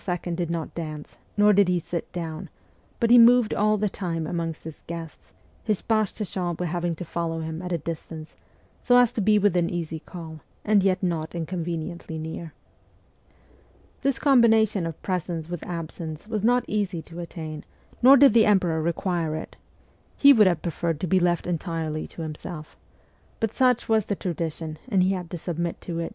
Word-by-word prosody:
did 170 -1 -2
not 165 -2 -3
dance, 155 -3 -7 0.2
nor 210 0 +6
did 200 -1 +5
he 180 0 +2
sit 170 0 -5
down, 170 0 -5 0.5
but 230 0 +2
he 245 - +9
moved 240 -1 +6
all 215 +1 +2
the 210 +1 0
time 170 -5 -3
amongst 165 0 -3
his 160 -1 -10
guests, 165 -2 -8 0.3
his 215 -4 -1
page 215 -3 +1
de 210 - -4
chambre 180 -2 -3
having 175 0 -2
to 175 - -7
follow 165 0 -3
him 160 +1 -5
at 180 0 -6
a 170 - +1
distance, 160 0 -7 0.5
so 245 -1 +4
as 245 -1 +5
to 235 - -2
be 210 +1 +4
within 180 -4 +2
easy 165 -2 -4
call, 160 -2 -9 0.3
and 210 -1 +4
yet 190 0 +1
not 165 -2 -2
inconveniently 170 -1 -4
near. 160 +1 -6 1.5
This 275 -2 +1
combination 225 - +4
of 165 - -7
presence 175 -3 -3
with 175 -2 -5
absence 165 0 -6
was 215 -2 -2
not 245 +1 +3
easy 195 -6 -2
to 170 +1 -10
attain, 160 -3 -7 0.4
nor 265 +3 +8
did 275 -4 +7
the 225 -2 +5
emperor 180 -6 +2
require 170 -1 -1
it: - - -7 0.6
he 280 0 +8
would 215 -6 +6
have 175 -4 0
preferred 165 -2 -2
to - - 0
be 185 +3 +3
left 175 -1 +1
entirely 165 -3 -3
to 165 - -8
himself; 155 0 -7 0.6
but 225 -2 -1
such 250 -2 +2
was 220 -3 +2
the 205 - -1
tradition, 160 -3 -4
and 195 -5 +3
he 185 - +2
had 180 -3 -4
to 175 - -5
submit 170 0 -3
to 170 -2 -4
it. 165 - -3
175 Hz, 180 wpm, -25 LUFS, 165-205 Hz, 1.5 s, he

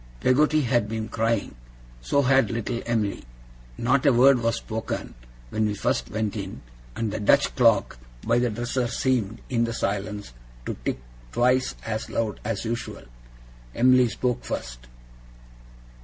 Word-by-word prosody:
Peggotty 150 - +3
had 120 -4 +1
been 110 -1 -3
crying. 115 -1 0 0.5
So 140 - +2
had 135 +1 +4
little 115 +1 -3
Em'ly. 110 -4 -1 0.5
Not 130 +3 +2
a 140 - +5
word 130 +1 +6
was 115 0 +1
spoken 110 -1 -4 0.4
when 110 0 +1
we 105 - -2
first - - -1
went 110 -1 -2
in; 95 -2 -6 0.3
and 110 -2 -2
the - - -2
Dutch 140 +7 +3
clock 115 - +3 0.3
by 115 +1 +3
the 120 0 +1
dresser 120 +3 -1
seemed, 120 -3 -1
in 120 -2 +1
the 115 - -3
silence, 100 - -3 0.3
to - - -2
tick - - -1 0.3
twice 125 - +2
as 110 -1 -3
loud 110 -3 -2
as 115 0 -3
usual. 115 +1 -4 0.7
Em'ly 125 +1 +5
spoke 125 +1 -2
first. - - -6
115 Hz, 145 wpm, -25 LUFS, 110-125 Hz, 0.7 s, word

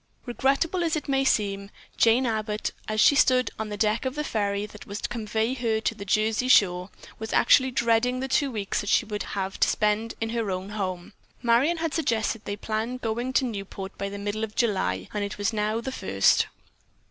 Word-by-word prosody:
Regrettable 275 +8 +1
as 325 -2 +1
it 310 - -4
may 270 -1 +2
seem, 200 -5 0 0.3
Jane 235 +3 +4
Abbott, 215 -2 -2 0.2
as 215 0 -1
she 285 - +7
stood 255 -4 +3
on 220 -1 -3
the 205 - -5
deck 215 +1 +1
of 260 +1 -3
the 300 - -2
ferry 205 -5 -1
that 210 0 -12
was 200 0 -5
to - - -3
convey 220 +1 -1
her 230 -4 0
to 220 - -1
the 220 - -8
Jersey 215 +4 +1
shore, 180 -7 +4 0.3
was 220 0 -5
actually 260 -1 +5
dreading 245 +1 +1
the 265 - -2
two 275 +1 +1
weeks 210 -5 -2
that 205 - -5
she 230 - +3
would 210 -1 -4 0.2
have 190 0 -3
to - - +4
spend 215 +2 0
in 225 0 -2
her 230 -3 -1
own 185 +1 -3
home. 185 -4 -4 0.3
Marion 245 +8 +3
had 325 -1 -2
suggested 230 -7 0
that - - -32
they 205 - -3
plan 220 +4 -3
going 240 +1 -2
to 265 - +3
Newport 195 -3 -6
by 200 - -2
the 200 - -6
middle 205 +2 -3
of 215 -1 -5
July 95 - 0
and 205 - -1
it 200 - -5
was 205 +2 -1
now 215 +1 0
the 265 +3 -4
first. 95 - +2
220 Hz, 215 wpm, -26 LUFS, 205-250 Hz, 0.3 s, she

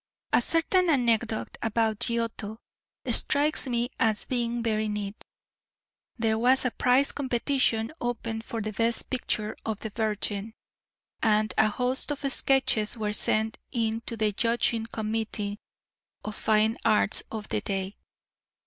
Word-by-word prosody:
A - - +5
certain 345 +2 +2
anecdote 235 -5 +1
about 225 -1 0
Giotto 230 -2 -2 0.5
strikes 295 0 +3
me 240 0 -1
as 215 -2 +2
being 240 -2 -1
very 215 -1 0
neat. 210 -1 -4 0.9
There 220 -1 +1
was 255 +3 +4
a 250 - +1
prize 255 +4 +3
competition 255 -2 0
opened 230 -2 -3
for 230 0 -4
the 215 0 -4
best 230 +2 0
picture 220 -4 -2
of 220 -2 -4
the 220 - -5
Virgin, 215 0 -2 0.7
and 215 -1 +2
a - - +4
host 250 +6 0
of 290 -1 -3
sketches 240 -5 +2
were 210 -1 -2
sent 220 +1 +1
in 225 -2 -1
to 230 - -4
the 215 -1 +1
judging 230 +1 +1
committee 215 -2 -3 0.7
of 215 - -4
fine 220 +1 +2
arts 210 -1 +3
of 215 -1 -6
the - - 0
day. 195 0 -3
225 Hz, 135 wpm, -27 LUFS, 215-240 Hz, 0.9 s, A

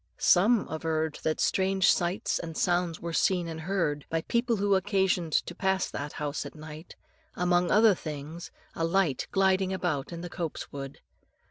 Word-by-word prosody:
Some 205 +5 +4
averred 160 -1 -2
that 155 - -1
strange 190 0 +3
sights 175 +2 0
and 165 -2 -6
sounds 175 -2 +1
were 170 0 -5
seen 180 0 +2
and 160 -1 -6
heard 160 -5 -1
by 165 0 0
people 235 +6 0
who 200 -1 +1
had 190 - +5
occasion 190 -4 +1
to - - 0
pass 190 -1 0
that 145 +1 -5
house 150 -1 -3
at - - -9
night, 155 +1 -10 0.4
among 175 0 +2
other 215 0 +6
things 155 0 -7 0.2
a 165 - -3
light 165 -5 +1
gliding 190 0 +2
about 175 -7 -2
in 170 0 -6
the 175 - -5
copse 170 -2 -5
wood. 135 -1 -7
175 Hz, 170 wpm, -28 LUFS, 155-190 Hz, 0.4 s, other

